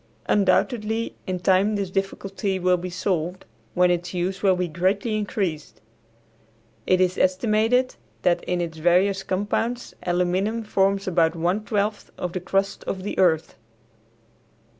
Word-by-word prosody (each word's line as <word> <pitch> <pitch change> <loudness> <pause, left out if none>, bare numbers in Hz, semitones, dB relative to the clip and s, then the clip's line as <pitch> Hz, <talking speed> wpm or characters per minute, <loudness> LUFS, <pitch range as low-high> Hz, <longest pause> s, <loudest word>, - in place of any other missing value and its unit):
Undoubtedly 220 +3 +1
in 185 -1 -2
time 190 +3 +3
this 195 -2 -2
difficulty 195 0 -2
will 180 0 +3
be 180 +1 -5
solved, 180 -1 -2 0.3
when 180 0 +4
its 175 +1 -2
use 185 +2 -2
will 190 -2 +4
be 180 0 -1
greatly 190 +7 0
increased. 195 -7 -3 1.1
It 185 - +4
is 185 0 +1
estimated 220 +6 +2 0.3
that 175 -1 +2
in 180 0 -1
its 165 -2 -5
various 185 +4 +3
compounds 205 +6 -2
aluminum 185 +5 0
forms 195 -2 +1
about 165 -2 +2
one 180 +6 0
twelfth 205 0 -1
of 180 -1 -4
the 185 - -2
crust 195 +2 -1
of 190 -1 -4
the 205 - -4
earth. 165 -4 +2
185 Hz, 140 wpm, -24 LUFS, 180-205 Hz, 1.1 s, when